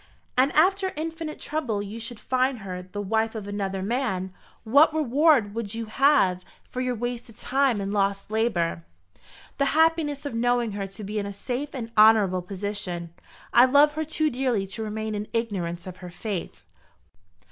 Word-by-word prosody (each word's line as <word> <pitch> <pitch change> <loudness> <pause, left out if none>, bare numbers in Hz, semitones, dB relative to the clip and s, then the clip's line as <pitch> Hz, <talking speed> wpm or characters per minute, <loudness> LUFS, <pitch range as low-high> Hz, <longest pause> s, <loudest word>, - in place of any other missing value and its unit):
"And 260 +2 +4
if, - - -5
after 380 +3 +3
infinite 320 0 -5
trouble, 245 -10 -2
you 210 +3 -7
should 230 0 -6
find 255 -2 0
her 180 -1 -5
the 185 +3 -8
wife 220 +3 0
of 210 -2 -5
another 195 -2 -3
man, 195 -5 -1 0.3
what 280 +9 +5
reward 285 -6 +3
would 225 -2 -4
you 230 0 -3
have 215 -7 +3 0.2
for 255 - -4
your 250 -1 -1
wasted 240 -1 -5
time 265 -4 +1
and 200 0 -3
lost 200 0 0
labour?" 185 - 0 0.8
"The 280 - +3
happiness 320 -3 +2
of 285 - -4
knowing 240 0 +1
her 200 -1 -4
to 195 +2 -10
be 210 +2 -3
in 200 - -3
a - - -4
safe 250 +8 -4
and 230 -3 -5
honourable 210 -4 +5
position. 180 -3 -5 0.4
I 240 - +8
love 285 +3 +5
her 315 +1 -2
too 310 0 0
dearly 245 -5 0
to 195 +3 -6
remain 215 0 -3
in 210 0 -4
ignorance 180 -7 -2
of 185 -1 -8
her 180 -1 -9
fate." 175 - -5
225 Hz, 175 wpm, -25 LUFS, 200-265 Hz, 0.8 s, I